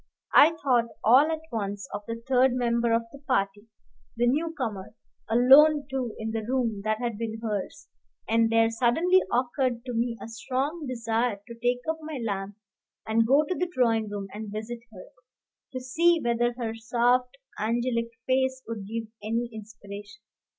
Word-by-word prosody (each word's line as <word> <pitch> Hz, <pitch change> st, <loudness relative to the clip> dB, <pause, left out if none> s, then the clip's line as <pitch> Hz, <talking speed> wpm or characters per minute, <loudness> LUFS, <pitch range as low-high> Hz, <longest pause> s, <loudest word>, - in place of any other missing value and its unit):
I 325 Hz, +2 st, +7 dB
thought 245 Hz, -4 st, +3 dB, 0.2 s
all 265 Hz, +8 st, +6 dB
at 320 Hz, 0 st, -3 dB
once 200 Hz, -3 st, -3 dB
of 205 Hz, -, -3 dB
the 230 Hz, 0 st, -5 dB
third 260 Hz, -1 st, +4 dB
member 235 Hz, -1 st, +1 dB
of 230 Hz, 0 st, +2 dB
the 280 Hz, -, -12 dB
party, 205 Hz, -6 st, -1 dB, 0.5 s
the 240 Hz, -, +2 dB
new 305 Hz, +7 st, +1 dB
comer, 220 Hz, -6 st, -4 dB, 0.3 s
alone 280 Hz, +5 st, +6 dB
too 255 Hz, -4 st, -3 dB
in 220 Hz, 0 st, -4 dB
the 225 Hz, 0 st, -2 dB
room 230 Hz, -3 st, -1 dB
that 215 Hz, 0 st, 0 dB
had 235 Hz, -2 st, -3 dB
been 225 Hz, -1 st, -4 dB
hers; 210 Hz, -4 st, -4 dB, 0.4 s
and 225 Hz, 0 st, +3 dB
there 225 Hz, 0 st, +4 dB
suddenly 320 Hz, +11 st, +3 dB
occurred 245 Hz, 0 st, 0 dB
to 250 Hz, -, -4 dB
me 230 Hz, 0 st, -1 dB
a -, -, -8 dB
strong 265 Hz, +7 st, -3 dB
desire 230 Hz, -3 st, -1 dB
to 235 Hz, -, -9 dB
take 245 Hz, +1 st, -1 dB
up 320 Hz, 0 st, -1 dB
my 310 Hz, -2 st, -6 dB
lamp 200 Hz, -4 st, -3 dB, 0.5 s
and 225 Hz, +1 st, +2 dB
go 280 Hz, +5 st, +4 dB
to -, -, 0 dB
the 360 Hz, 0 st, -2 dB
drawing 225 Hz, -7 st, +1 dB
room 205 Hz, -1 st, -4 dB
and 210 Hz, 0 st, -6 dB
visit 220 Hz, +3 st, -5 dB
her, 185 Hz, -4 st, -11 dB, 0.7 s
to 255 Hz, -, -4 dB
see 330 Hz, +7 st, +2 dB
whether 240 Hz, -2 st, +1 dB
her 230 Hz, -3 st, -3 dB
soft, 245 Hz, +3 st, +1 dB, 0.2 s
angelic 230 Hz, +1 st, 0 dB, 0.2 s
face 260 Hz, 0 st, +1 dB
would 215 Hz, -4 st, -6 dB
give 225 Hz, +2 st, -3 dB, 0.2 s
any 230 Hz, +3 st, -2 dB
inspiration. 205 Hz, -1 st, -10 dB
235 Hz, 170 wpm, -27 LUFS, 220-260 Hz, 0.7 s, I